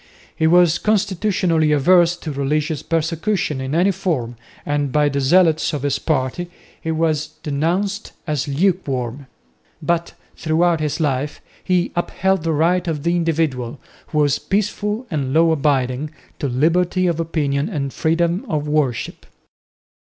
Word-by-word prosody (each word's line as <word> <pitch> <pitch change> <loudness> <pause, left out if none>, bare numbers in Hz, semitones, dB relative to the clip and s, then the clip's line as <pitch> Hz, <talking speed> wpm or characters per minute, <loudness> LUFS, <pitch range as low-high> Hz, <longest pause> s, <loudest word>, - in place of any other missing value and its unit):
He 160 - +2
was 175 -1 +5
constitutionally 190 -6 +1
averse 175 +4 +4
to 160 - -6
religious 150 +2 -1
persecution 165 -1 -1
in 130 +3 -3
any 180 +4 +3
form, 130 -11 -2 0.3
and 145 -2 -1
by 150 +1 +3
the 140 0 -1
zealots 165 +2 +3
of 145 -2 -3
his 145 -1 0
party 155 +3 -1 0.3
he 160 - -4
was 155 -1 0 0.2
denounced 175 +8 -1
as 150 -3 -2
lukewarm; 140 -6 -1 0.5
but 170 +1 -1 0.2
throughout 165 +1 +1
his 150 0 -2
life 145 -1 -1 0.2
he 180 -2 +1
upheld 190 +1 0
the 165 0 -1
right 170 +4 +1
of 150 -3 -2
the 170 +1 +1
individual, 155 -7 -1 0.3
who 155 - -4
was 145 -2 +3
peaceful 210 +3 -1
and 140 -3 -2
law 165 0 +5
abiding, 140 -2 0 0.3
to 145 - -1
liberty 170 +8 +1
of 170 -2 0
opinion 145 -4 -1
and 140 -3 -3
freedom 170 +3 +1
of 150 -1 -1
worship. 150 -5 -1
160 Hz, 140 wpm, -20 LUFS, 145-175 Hz, 0.5 s, was